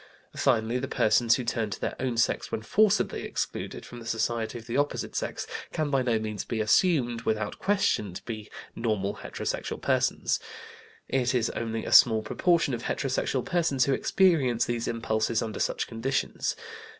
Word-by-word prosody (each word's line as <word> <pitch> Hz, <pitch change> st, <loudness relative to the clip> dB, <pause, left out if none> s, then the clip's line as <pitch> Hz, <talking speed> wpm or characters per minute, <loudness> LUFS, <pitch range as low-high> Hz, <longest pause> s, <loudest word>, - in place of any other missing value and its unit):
Finally, 120 Hz, -1 st, +1 dB
the 135 Hz, -, -3 dB
persons 115 Hz, +1 st, +3 dB
who 125 Hz, -, -3 dB
turn 115 Hz, -2 st, -1 dB
to 100 Hz, -, -5 dB
their -, -, -3 dB
own 125 Hz, -3 st, -1 dB
sex 120 Hz, -, +1 dB
when 110 Hz, -, -3 dB
forcibly 210 Hz, -, +2 dB
excluded -, -, -4 dB
from 120 Hz, -, -10 dB
the 115 Hz, -, -10 dB
society 115 Hz, +1 st, -1 dB
of 115 Hz, -, -10 dB
the 120 Hz, +1 st, -4 dB
opposite 145 Hz, +1 st, -1 dB
sex, -, -, -3 dB, 0.3 s
can 155 Hz, -2 st, -1 dB
by 135 Hz, -2 st, +3 dB
no 120 Hz, -3 st, +1 dB
means 110 Hz, -2 st, -4 dB
be 115 Hz, -, -3 dB
assumed, 120 Hz, -, +2 dB
without 110 Hz, -2 st, -2 dB
question, 190 Hz, -, +1 dB
to 90 Hz, -, -8 dB
be 110 Hz, -2 st, -6 dB, 0.3 s
normal 105 Hz, -4 st, -1 dB
heterosexual -, -, -4 dB
persons. -, -, +1 dB, 0.7 s
It 130 Hz, -1 st, +1 dB
is 120 Hz, -2 st, +1 dB
only 115 Hz, -1 st, -3 dB
a -, -, -4 dB
small 110 Hz, -2 st, +7 dB
proportion 165 Hz, -, +2 dB
of 115 Hz, -, -3 dB
heterosexual 130 Hz, 0 st, -1 dB
persons 160 Hz, -8 st, +2 dB
who 140 Hz, -, +2 dB
experience 140 Hz, -10 st, +3 dB
these 120 Hz, -1 st, -2 dB
impulses 115 Hz, -1 st, 0 dB
under 110 Hz, -3 st, -5 dB
such -, -, 0 dB
conditions. 115 Hz, -, -2 dB
120 Hz, 170 wpm, -27 LUFS, 110-135 Hz, 0.7 s, small